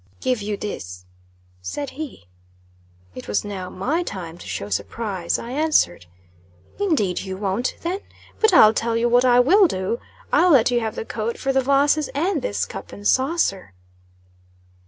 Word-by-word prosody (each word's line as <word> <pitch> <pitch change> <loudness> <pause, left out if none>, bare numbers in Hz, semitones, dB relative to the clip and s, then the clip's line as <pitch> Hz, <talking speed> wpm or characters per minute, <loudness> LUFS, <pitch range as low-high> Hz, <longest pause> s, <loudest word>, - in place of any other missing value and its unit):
"Give 250 -4 0
you 205 0 -3
this," 90 - -6 0.6
said 280 - -5
he. 285 - -8 0.9
It 125 - -9
was 105 - -1
now 190 -3 -5
my 275 - -1
time 175 - -6
to - - -11
show 100 - -4
surprise; 170 - -2
I 235 - -7
answered 260 - +1 0.7
"Indeed 280 - +1
you 190 -1 -5
won't, 200 +5 -1
then. 360 +3 -2 0.4
But 440 -1 +4
I'll 220 - +7
tell 230 +1 0
you 235 +1 +2
what 245 +1 +4
I 245 -1 +5
will 370 +10 +6
do; 190 - -2 0.3
I'll 360 - +5
let 250 -2 +5
you 240 - +2
have 220 -2 -3
the - - -5
coat 225 +1 -3
for 270 - -1
the 265 - +3
vases 280 +3 +2
and 330 +1 0
this 100 - -1
cup - - -9
and 205 0 -4
saucer." 260 - +1
230 Hz, 165 wpm, -22 LUFS, 190-280 Hz, 0.9 s, I'll